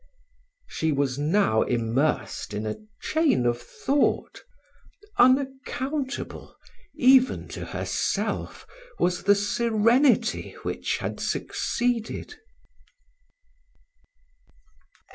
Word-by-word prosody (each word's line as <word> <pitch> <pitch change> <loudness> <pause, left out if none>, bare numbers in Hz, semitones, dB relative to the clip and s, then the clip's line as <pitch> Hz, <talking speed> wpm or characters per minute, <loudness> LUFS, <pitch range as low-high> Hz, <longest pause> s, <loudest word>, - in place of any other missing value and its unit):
She 160 0 -1
was 140 -2 0
now 150 - +2
immersed 120 -1 -1
in 105 +1 -3
a 110 - -3 0.3
chain 310 - +2
of 120 0 0
thought; 280 - -1 0.8
unaccountable, 270 0 0 0.4
even 260 0 +4
to - - -6
herself, - - -2 0.3
was 180 0 0
the 205 - +6
serenity 230 +5 +2
which - - -2
had - - -4
succeeded. 240 -2 -2
215 Hz, 75 wpm, -25 LUFS, -, 0.8 s, the